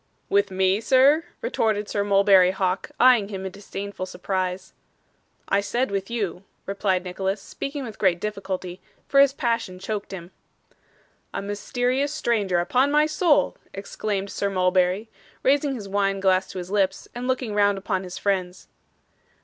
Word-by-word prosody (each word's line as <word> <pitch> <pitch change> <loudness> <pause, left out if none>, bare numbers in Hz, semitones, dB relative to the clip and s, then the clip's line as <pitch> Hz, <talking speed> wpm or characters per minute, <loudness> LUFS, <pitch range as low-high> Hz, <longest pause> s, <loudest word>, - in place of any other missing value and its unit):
'With 400 +1 +3
me, 190 +2 +1
sir?' 275 +7 +4 0.2
retorted 220 - 0
Sir 205 -1 -1
Mulberry 195 -2 +5
Hawk, 190 0 -1
eyeing 245 -5 +5
him 190 -2 -5
in 190 - -4
disdainful 200 -1 -6
surprise. 185 0 -3 0.8
'I 200 - +3
said 240 +3 -1
with 195 0 -2
you,' 200 -6 -3 0.2
replied 195 -2 0
Nicholas, 190 +2 -2
speaking 275 +7 -6
with 225 -4 -8
great 180 -4 +2
difficulty, 190 -3 -5 0.3
for 275 - +3
his 280 -1 +7
passion 230 -9 -2
choked 205 +2 -5
him. 180 -2 -8 1.0
'A - - -3
mysterious 245 +7 -1
stranger, 215 - 0
upon 250 +11 +2
my 300 +1 +4
soul!' 310 0 +2 0.2
exclaimed 200 0 -3
Sir 200 - -1
Mulberry, 185 +2 +1 0.4
raising 280 +1 +2
his 210 -5 -7
wine 195 0 0
glass 190 -1 +2
to - - -9
his 180 +1 -6
lips, 195 -2 0
and 245 +1 -5
looking 255 -4 -1
round 205 -1 +3
upon 195 -1 -2
his 180 -1 -7
friends. 185 -2 -2
200 Hz, 150 wpm, -24 LUFS, 190-240 Hz, 1.0 s, his